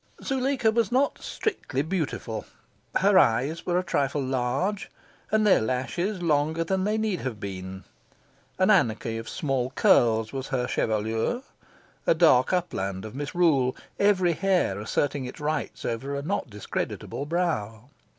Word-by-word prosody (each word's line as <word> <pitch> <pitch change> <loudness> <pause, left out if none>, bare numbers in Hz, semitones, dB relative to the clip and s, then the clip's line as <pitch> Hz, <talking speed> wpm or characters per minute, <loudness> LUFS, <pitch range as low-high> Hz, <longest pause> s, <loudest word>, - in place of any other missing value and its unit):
Zuleika 265 -3 +1
was 225 -2 +1
not 270 +3 +2
strictly 140 - -2
beautiful. 150 - -3 0.5
Her 195 0 +5
eyes 135 +6 +1
were 175 0 +2
a 180 - +1
trifle 145 -4 0
large, 130 +11 -1 0.4
and 215 0 +2
their 200 - +5
lashes 170 - -2
longer 155 +1 +1
than 190 +2 0
they 210 +1 +1
need 215 -4 -1
have 125 -5 -4
been. 95 -1 -6 0.7
An 185 +3 +4
anarchy 115 - +2
of 115 - -7
small 135 -7 -1
curls 115 -4 +3
was 135 -1 -4
her 130 -3 -1
chevelure, 110 - -1 0.6
a - - +5
dark 140 -6 +5
upland 100 - -2
of 110 - -8
misrule, 145 -2 +1 0.2
every 185 -4 +3
hair 180 - +1
asserting 135 +6 -1
its 125 - -8
rights 150 0 -3
over 130 +5 -3
a 140 - -3
not 175 -4 -2
discreditable 105 +6 -4
brow. 140 -9 -2
145 Hz, 140 wpm, -26 LUFS, 120-185 Hz, 0.7 s, Her